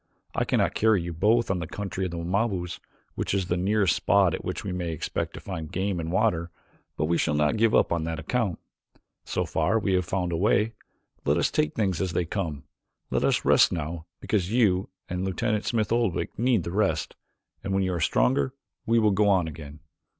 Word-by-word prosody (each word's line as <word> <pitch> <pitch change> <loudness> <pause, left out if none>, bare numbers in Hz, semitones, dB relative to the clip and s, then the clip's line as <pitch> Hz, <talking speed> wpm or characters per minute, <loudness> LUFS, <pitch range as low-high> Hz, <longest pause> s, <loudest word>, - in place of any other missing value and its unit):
I - - 0
cannot - - +1
carry 110 -2 +3
you 85 0 -4
both 110 +8 +3
to - - 0
the 90 -3 -3
country 95 -1 -4
of - - -2
the 85 - -5
Wamabos, 90 0 -1 0.3
which - - -2
is 95 -2 0
the 90 - +2
nearest 95 0 +2
spot - - +3
at - - -4
which - - -4
we 100 - -3
may 90 -2 -3
expect 80 - -3
to - - -7
find 80 -5 -6
game 95 0 -1
and 80 0 -3
water, 90 -4 +1 0.5
but 75 - +1
we 85 +2 +1
shall 75 - +1
not 75 +5 +2
give 110 0 +3
up - - +3
on 85 -1 0
that 80 0 -3
account. 100 +4 -1 0.7
So - - -1
far 85 +8 +1
we 100 -3 0
have 90 0 +2
found 90 -1 -1
a - - 0
way. 105 +4 +2 0.5
Let - - +2
us - - +1
take 75 - 0
things 95 -6 0
as 95 -3 -1
they 90 - 0
come. 80 -6 -3 0.5
Let - - +1
us - - +1
rest - - +5
now 80 0 -4
because 95 -3 -1
you 100 -6 +2 0.2
and 90 +1 -3
Lieutenant 105 +3 -1
Smith 110 -3 0
Oldwick 115 -6 0
need 120 -6 +2
the 85 - -4
rest, 85 -6 0 0.5
and 100 - -3
when 95 0 +2
you 95 -1 0
are 85 - -2
stronger 130 - +2 0.3
we 115 +1 +3
will 110 -2 +4
go 100 +1 +3
on 95 -4 +3
again." 75 -1 -9
95 Hz, 215 wpm, -26 LUFS, 85-105 Hz, 0.7 s, rest